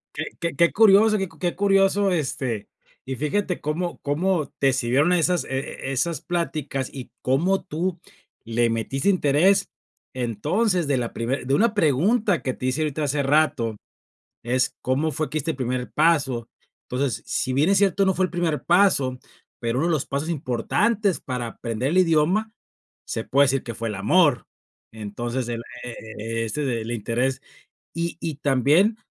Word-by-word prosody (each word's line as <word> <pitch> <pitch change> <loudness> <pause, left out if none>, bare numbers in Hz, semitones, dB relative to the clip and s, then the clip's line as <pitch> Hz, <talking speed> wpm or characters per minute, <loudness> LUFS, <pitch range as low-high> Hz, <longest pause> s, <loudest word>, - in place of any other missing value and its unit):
Qué 155 - -3
qué 170 -3 -2
qué 170 -2 +3
curioso, 215 0 +6
qué 195 -2 -2
qué 175 -1 -1
curioso. 195 0 +3
Este, 130 - -2 0.4
y 130 - -4
fíjate 175 +7 -1
cómo 170 +4 -3
cómo 155 +1 0
te 135 -2 +3
sirvieron 130 +7 +2
esas 180 +1 +2
e 135 0 -4
esas 155 +5 -1
pláticas, 155 -6 -3
y 130 -3 -8
cómo 170 +10 +1
tú, 170 +3 -3 0.4
le 115 +1 +1
metiste 135 - -1
interés. 185 +3 +3 0.4
Entonces, 155 - 0
de 140 -2 +1
la 120 -2 -3
primer 125 +2 -3
de 135 - +1
una 220 +7 +3
pregunta, 195 - +2
que 130 - -2
te 125 - -7
hice 130 +4 0
ahorita, 155 0 -1
hace 145 0 0
rato, 135 -6 +1 0.7
es: 125 +2 0
"¿cómo 140 +5 0
fue 155 -1 -3
que 155 - -5
diste 160 +2 -2
el - - -10
primer 125 -1 -3
paso?". 140 -7 +2 0.3
Entonces, 130 0 -2
si 130 - -1
bien 150 +7 +3
es 200 - +4
cierto, 195 0 +3
no 190 - +3
fue 185 +1 +2
el - - -11
primer 175 -4 -1
paso, 170 -9 +3 0.4
pero 120 +1 -1
uno 160 - +1
de - - +1
los 150 -4 0
pasos 140 +3 -3
importantes, 185 - 0
para 125 -2 -4
aprender 115 +2 -3
el 185 - +2
idioma, 180 +6 +2 0.5
se - - -3
puede 140 +1 +4
decir, 135 0 0
que 115 - -5
fue 115 -1 -4
el 105 - -4
amor. 145 - +3 0.5
Entonces, 120 +4 -4
el 115 0 -3 0.2
e 125 - -5
e 110 +1 -6
e - - -1
este 115 +7 -3
del 115 -2 -2
interés. 120 +4 -1 0.5
Y 170 0 -3
y 160 -4 -3
también, 150 - +3
145 Hz, 170 wpm, -24 LUFS, 125-180 Hz, 0.7 s, curioso